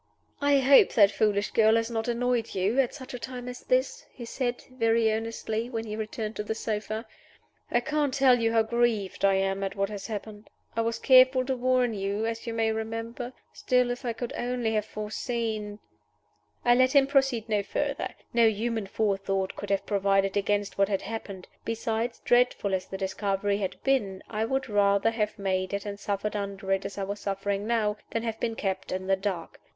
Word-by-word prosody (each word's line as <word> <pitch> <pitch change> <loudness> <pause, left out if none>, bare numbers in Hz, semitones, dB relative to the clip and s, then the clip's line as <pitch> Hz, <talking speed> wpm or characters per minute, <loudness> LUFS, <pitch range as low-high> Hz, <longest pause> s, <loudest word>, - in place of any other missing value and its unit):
"I 285 0 +4
hope 270 +1 +6
that 205 -3 +6
foolish 205 0 +1
girl 220 0 +5
has 230 +1 0
not 225 0 -2
annoyed 240 -1 0
you 195 +7 +1
at 260 -3 +1
such 265 -2 -9
a 250 - -5
time 250 0 -6
as 250 0 -6
this," - - 0
he 240 - -9
said, 245 0 -3
very 230 -2 +2
earnestly, 225 +1 -3
when 225 -2 -3
he 215 -1 -5
returned 220 0 -4
to 210 - -2
the 220 +1 -3
sofa. 220 +1 -3 0.6
"I 240 - +2
can't 300 0 0
tell 260 -2 +4
you 225 0 +2
how 225 -1 +4
grieved 225 -4 0
I 195 -1 +5
am 195 0 0
at 195 - -3
what 195 0 0
has 205 -2 -6
happened. 215 -1 -7 0.3
I 230 - +1
was 230 0 -1
careful 255 +1 +6
to 265 0 0
warn 250 -1 +2
you, 200 +2 -2
as 230 +1 -4
you 230 - -2
may 225 -1 +2
remember. 225 +2 -4 0.2
Still, 250 -1 +2
if 245 +2 -5
I 240 - -1
could 230 +1 -5
only 240 -2 -1
have 215 -1 0
foreseen 215 -1 -3 0.4
" - - -40
I 240 - +6
let 255 +1 +4
him 275 -1 +7
proceed 270 -5 +1
no 210 -2 +1
further. 280 +7 -2 0.2
No 235 -1 +5
human 220 -1 -1
forethought 195 -2 -1
could 205 - -7
have 195 -1 0
provided 195 -1 +1
against 205 0 0
what 195 0 +4
had 195 -2 -1
happened. 200 -3 -6 0.2
Besides, 230 +1 -2
dreadful 245 -5 +3
as 185 -1 -1
the 190 - -5
discovery 200 +1 -1
had 190 -2 -2
been, 205 -9 0
I 220 0 -1
would 265 +3 -1
rather 205 0 +3
have 215 -2 -2
made 190 0 -1
it, 200 - -4
and 200 -1 -5
suffered 205 +1 -2
under 200 -1 -4
it, 195 0 +1
as 195 0 -6
I 200 - -2
was 200 +1 -4
suffering 200 +1 -2
now, 215 -3 +1
than 230 - -2
have 225 -1 -3
been 230 -1 -1
kept 190 -3 -3
in 185 0 -3
the 195 0 +3
dark. 190 -4 -4
220 Hz, 200 wpm, -27 LUFS, 200-240 Hz, 0.6 s, him